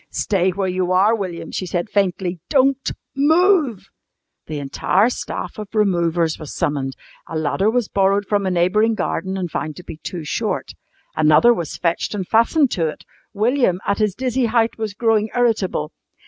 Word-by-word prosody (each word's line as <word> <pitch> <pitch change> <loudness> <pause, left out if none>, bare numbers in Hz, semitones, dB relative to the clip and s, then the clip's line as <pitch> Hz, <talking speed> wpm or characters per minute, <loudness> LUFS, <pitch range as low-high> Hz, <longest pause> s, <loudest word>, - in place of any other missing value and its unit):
"Stay 190 -2 0
where 190 +1 -2
you 185 0 -1
are, 195 +4 +4
William," 185 -6 -4
she 185 - -3
said 175 +3 -2
faintly. 185 -3 -1
"Don't 270 -1 +2 0.2
move." 310 - +2 0.6
The 155 - -4
entire 180 - +1
staff 240 - -5
of 210 +1 -8
removers 170 -5 +1
was 155 - -8
summoned. 140 -5 -1 0.3
A 165 - -4
ladder 155 +7 +1
was 240 -1 0
borrowed 200 +1 +1
from 205 -1 0
a - - +2
neighbouring 195 +6 +2
garden 190 -1 -2
and 180 -3 -3
found 155 -1 -3
to 180 - -11
be 165 - -9
too 170 +1 -6
short. 150 - -2 0.4
Another 155 +10 +5
was 170 -8 -5
fetched 170 +4 -1
and 190 -3 -4
fastened 245 +5 +3
to 165 -3 0
it. 155 - -7 0.3
William, 220 -3 +1
at 200 - 0
his 210 -3 +1
dizzy 255 -1 0
height, 230 0 +1
was 220 -2 -4
growing 220 -1 +1
irritable. 210 -10 0
195 Hz, 170 wpm, -20 LUFS, 175-225 Hz, 0.6 s, Another